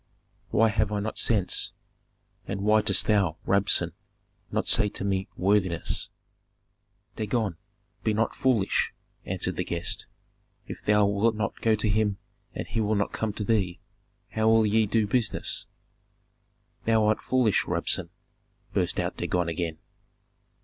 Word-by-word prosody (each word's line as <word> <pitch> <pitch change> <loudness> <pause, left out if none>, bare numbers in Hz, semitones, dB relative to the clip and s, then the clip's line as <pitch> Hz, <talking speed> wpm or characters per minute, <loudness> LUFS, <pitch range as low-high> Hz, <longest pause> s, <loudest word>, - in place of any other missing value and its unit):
"Why 115 +1 +4
have 110 -1 0
I 105 - 0
not 110 +2 -3
sense, 105 -6 +1 0.7
and 100 0 -3
why 105 +1 +4
dost 105 -2 +3
thou, 100 -7 +2
Rabsun, 100 +1 +3 0.6
not - - -1
say 105 - +4
to 100 - -5
me 95 0 0
worthiness?" 95 -3 0 1.1
"Dagon, 105 -4 -1 0.5
be 110 - +2
not 110 +2 0
foolish!" 120 -7 +1 0.3
answered - - -2
the - - 0
guest. 85 0 -3 0.6
"If - - -9
thou 105 0 +4
wilt 100 +3 +2
not 105 -1 -3
go 110 -1 +3
to 105 +1 -1
him 105 -1 +1 0.4
and - - -3
he 110 +5 -2
will 110 0 +1
not 100 0 -1
come 110 -1 -1
to 105 - -3
thee, 95 -5 0 0.5
how 110 0 +2
will 110 0 +5
ye 110 +1 +3
do 110 +1 +2
business?" 110 0 -1 1.2
"Thou 110 -1 +3
art 110 +1 +2
foolish, 125 -6 +2
Rabsun!" - - +1 0.6
burst - - 0
out - - -2
Dagon 90 -2 0
again. 80 -1 -3
105 Hz, 140 wpm, -27 LUFS, 100-110 Hz, 1.2 s, will